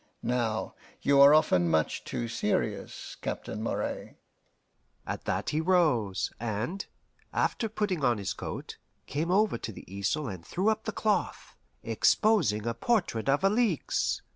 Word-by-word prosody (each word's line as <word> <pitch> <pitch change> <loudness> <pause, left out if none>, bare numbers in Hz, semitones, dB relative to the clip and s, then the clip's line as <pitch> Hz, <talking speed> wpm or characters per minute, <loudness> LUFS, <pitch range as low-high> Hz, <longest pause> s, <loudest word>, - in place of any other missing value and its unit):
Now, 115 -3 -1 0.3
you 140 -1 +5
are 140 +1 +9
often 90 - +4
much 80 -1 +1
too 120 - -3
serious, 110 -2 -2
Captain - - -4
Moray." - - -3 0.9
At - - -5
that - - -1
he 155 - +1
rose, 150 - +2
and, 120 - -2 0.5
after 225 - 0
putting 200 -7 -1
on 120 -3 +3
his 100 -2 -3
coat, - - -6 0.3
came 155 +5 -2
over 195 - +2
to 110 - -5
the - - -11
easel 100 - -2
and 95 -6 -6
threw 190 - 0
up 220 0 -1
the 215 - -1
cloth, 215 -1 -1 0.3
exposing 115 - +2
a 115 - 0
portrait 175 - 0
of 140 +7 +2
Alixe! 205 - +1
140 Hz, 140 wpm, -29 LUFS, -, 0.9 s, are